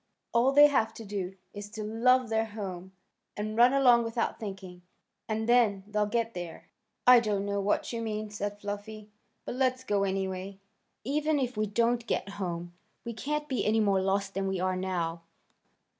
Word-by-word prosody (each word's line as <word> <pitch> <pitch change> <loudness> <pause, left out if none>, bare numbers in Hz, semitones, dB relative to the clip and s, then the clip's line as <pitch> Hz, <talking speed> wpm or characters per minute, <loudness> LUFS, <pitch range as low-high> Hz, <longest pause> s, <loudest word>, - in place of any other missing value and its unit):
All 240 +3 +4
they 290 +1 +8
have 225 -6 +2
to 225 - -9
do 195 -2 -4 0.2
is 205 0 -7
to 215 0 -6
love 240 +3 +3
their 225 0 +1
home, 190 -4 -7 0.5
and 215 +1 -3
run 240 +2 +6
along 250 -4 +5
without 230 0 -2
thinking, 190 -4 -7 0.5
and 220 +1 -1
then 230 -5 +3
they'll 210 0 0
get 230 +1 -1
there." 175 -2 -8 0.3
"I 250 -1 +9
don't 205 -3 -1
know 200 0 -1
what 205 +4 0
you 230 - -3
mean," 215 -1 -4
said 205 0 -4
Fluffy, 205 +1 -7 0.3
"but - - -4
let's 255 0 0
go 205 -5 +1
anyway. 190 0 -3 0.5
Even 300 +4 0
if 255 -2 -1
we 215 0 0
don't 235 +3 +1
get 200 - -1
home 175 -1 -4 0.3
we 235 - -4
can't 295 +6 -3
be 260 -4 -1
any 220 +1 +2
more 200 -3 +3
lost 195 +1 0
than 195 0 -1
we 190 -1 -1
are 185 0 0
now." 175 -3 -2
210 Hz, 180 wpm, -29 LUFS, 195-235 Hz, 0.5 s, I